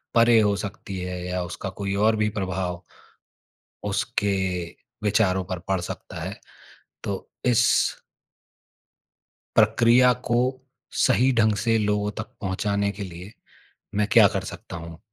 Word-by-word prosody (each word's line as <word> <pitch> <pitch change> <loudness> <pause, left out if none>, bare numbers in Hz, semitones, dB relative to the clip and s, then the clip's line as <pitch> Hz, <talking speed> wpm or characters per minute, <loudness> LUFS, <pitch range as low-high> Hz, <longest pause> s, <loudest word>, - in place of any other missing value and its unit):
परे 115 0 +6
हो 105 -2 +3
सकती 100 -1 -6
है 90 0 -4
या 90 0 -2
उसका 90 +3 -5
कोई 100 -1 -1
और 110 0 +4
भी 105 0 +1
प्रभाव 95 -2 -2 1.1
उसके 100 -1 0 0.7
विचारों 95 -3 +2
पर 90 - -2
पड़ 95 -1 +1
सकता 85 - -7
है। - - -5 0.7
तो - - -4 0.2
इस 120 -2 +4 1.9
प्रक्रिया 115 +3 +5
को 120 - +1 0.7
सही 130 +3 +4
ढंग 110 -1 +4
से 115 +2 +2
लोगों 105 -1 0
तक - - -4
पहुँचाने 100 +1 0
के 105 - -4
लिए 90 +1 -9 0.6
मैं 105 +1 +2
क्या 110 -2 +8
कर 95 -1 -1
सकता - - -9
हूँ? 85 -1 -9
100 Hz, 130 wpm, -24 LUFS, 95-110 Hz, 1.9 s, क्या